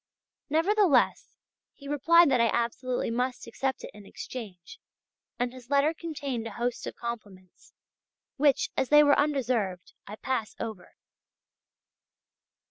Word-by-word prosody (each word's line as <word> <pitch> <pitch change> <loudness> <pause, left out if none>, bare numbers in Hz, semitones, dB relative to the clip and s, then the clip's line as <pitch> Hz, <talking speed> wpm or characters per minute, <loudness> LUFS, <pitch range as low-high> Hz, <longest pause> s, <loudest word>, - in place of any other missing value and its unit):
Nevertheless, 360 +2 +2 0.4
he 280 - -12
replied 295 +3 +5
that 250 -3 +3
I 230 - +4
absolutely 240 +1 -1
must 250 +2 -2
accept 265 +3 -3
it - - -8
in 210 - -13
exchange, 200 -9 -9 0.6
and 245 0 -2
his 255 -1 -13
letter 285 +3 +3
contained 280 -8 -5
a 220 - -8
host 240 +1 -3
of - - -6
compliments 205 -6 -9 0.6
which, 285 -1 +2
as 260 - 0
they 295 0 +7
were 290 -1 +5
undeserved, 240 -11 -1
I 210 - -7
pass 230 -2 -3
over. 215 -6 -7
250 Hz, 130 wpm, -28 LUFS, 230-285 Hz, 0.6 s, they